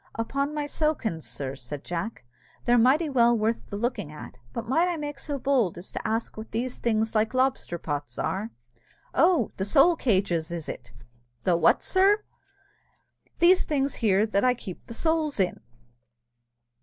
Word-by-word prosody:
"Upon 275 +5 -1
my 295 -1 -1
sowkins, 290 - -1
sir," 135 -1 -5
said 135 +2 -7
Jack, 175 - -4 0.4
"they're 240 - +3
mighty 275 +8 +4
well 240 -4 +4
worth 225 +2 -1
the 200 - -4
looking 215 - -2
at; 150 -4 -10
but 235 - -5
might 325 +8 +3
I 350 -2 -1
make 290 -2 -5
so 285 0 -3
bold 255 -10 +1
as 175 - -8
to - - -4
ask 225 +1 -2
what 220 +1 -8
these 240 +3 -3
things 220 -1 0
like 220 +2 +1
lobster 255 -9 +1
pots 145 -3 -5
are?" 205 +4 -2 0.6
"Oh! 335 - +3
the 190 - -1
Soul 275 - +5
Cages, 185 - +1
is 170 -2 -5
it?" 120 -1 -7 0.5
"The 180 - +3
what? 170 -1 +3
sir!" 400 +3 +3 1.1
"These 360 +2 +5
things 280 -2 0
here 205 -2 +4
that 205 -2 0
I 250 -1 +4
keep 190 -7 -9
the 230 - -8
souls 320 -4 0
in." 185 -2 +1
230 Hz, 170 wpm, -26 LUFS, 190-280 Hz, 1.1 s, Soul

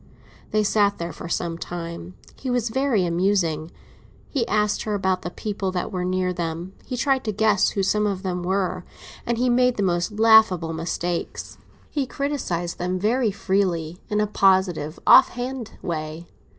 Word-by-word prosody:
They 215 0 +2
sat 205 -1 +2
there 170 -1 -5
for 165 - -8
some 170 -1 -2
time. 170 +1 -6 0.2
He 265 - -6
was 245 -2 0
very 250 -5 +1
amusing. 170 -3 0 0.6
He 255 -6 0
asked 210 0 +1
her 210 -1 -2
about 190 -2 0
the - - -4
people 200 0 -3
that 180 - -2
were 180 -1 -2
near 185 0 0
them; 170 +1 -4
he 250 - -5
tried 265 0 +1
to 215 - 0
guess 210 -1 +3
who 195 - -1
some 210 +2 +2
of 195 -1 -3
them 180 -2 -2
were, 185 0 -1 0.4
and 235 -1 0
he 250 +2 +1
made 250 0 +3
the 205 - +1
most 175 +1 0
laughable 215 -7 +5
mistakes. 170 +1 -4 0.3
He 280 -3 -1
criticised 245 - -3
them 180 +1 -1
very 225 +5 +1
freely, 185 -4 -1
in 210 - 0
a 210 - +3
positive, 190 -6 +2
off - - +8
hand 245 -1 -5
way. 155 0 -4
190 Hz, 170 wpm, -23 LUFS, 175-220 Hz, 0.6 s, off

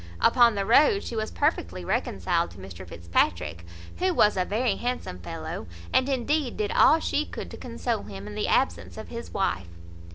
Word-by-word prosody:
Upon 235 - +5
the 200 -1 -1
road 400 - +5
she 235 - -5
was 220 0 -2
perfectly 90 - -1
reconciled 85 - 0
to 85 - -15
Mr 95 -1 -10
Fitzpatrick, 85 0 -1 0.3
who 370 -1 +1
was 210 -6 +4
a 185 - +1
very 215 +2 0
handsome 245 - -3
fellow, 90 - -6 0.3
and 260 +2 +3
indeed 275 +1 0
did 210 -1 -1
all 320 - +6
she 300 - 0
could 85 - -8
to - - -8
console 80 +5 -3
him 100 -1 -9
in 105 - -7
the - - -2
absence 85 +1 0
of - - -8
his - - -7
wife. 90 -2 -1
195 Hz, 185 wpm, -26 LUFS, -, 0.3 s, all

